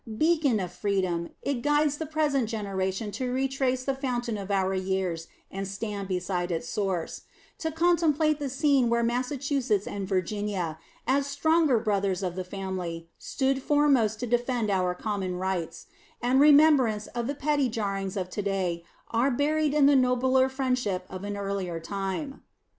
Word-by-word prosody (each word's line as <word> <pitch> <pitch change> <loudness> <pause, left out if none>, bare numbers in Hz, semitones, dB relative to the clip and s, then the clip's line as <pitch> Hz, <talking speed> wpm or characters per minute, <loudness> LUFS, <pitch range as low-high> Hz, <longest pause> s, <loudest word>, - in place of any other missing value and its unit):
Beacon 310 -7 +3
of 180 -2 -4
freedom, 185 -3 -1
it 275 -4 -1
guides 295 +1 +2
the 320 - -3
present 290 -6 +1
generation 200 -1 -2
to 250 +5 -3
retrace 260 0 0
the 275 - 0
fountain 245 -4 -2
of 200 -1 -6
our 190 -1 +1
years 185 -3 -2 0.2
and 195 0 -4
stand 200 0 -4
beside 180 -1 -2
its 165 -1 -2
source; 190 -3 -2 0.4
to 320 - -2
contemplate 320 -2 +2
the 285 -2 -2
scene 275 -2 +2
where 235 0 +2
Massachusetts 250 -2 0
and 200 -1 -4
Virginia, 185 -3 -2 0.3
as 275 +2 +2
stronger 305 -1 +3
brothers 200 -4 0
of 180 -2 -1
the 185 - -3
family, 180 -3 -5
stood 270 0 -1
foremost 270 -7 +3
to 245 - -2
defend 240 -2 0
our 180 -2 +1
common 195 -2 -3
rights; 180 -3 -3 0.3
and 250 +2 +2
remembrance 285 -7 +5
of 240 -1 -4
the 285 - -2
petty 285 -2 +1
jarrings 195 -4 -3
of 185 -2 -2
to 205 - -2
day 185 -4 -1 0.3
are 235 +4 +2
buried 300 +3 +1
in 295 -2 +5
the 285 0 +6
nobler 260 0 +3
friendship 250 -8 -1
of 185 +1 -6
an 205 0 -4
earlier 195 -4 -3
time. 195 - -4
225 Hz, 160 wpm, -27 LUFS, 190-275 Hz, 0.4 s, the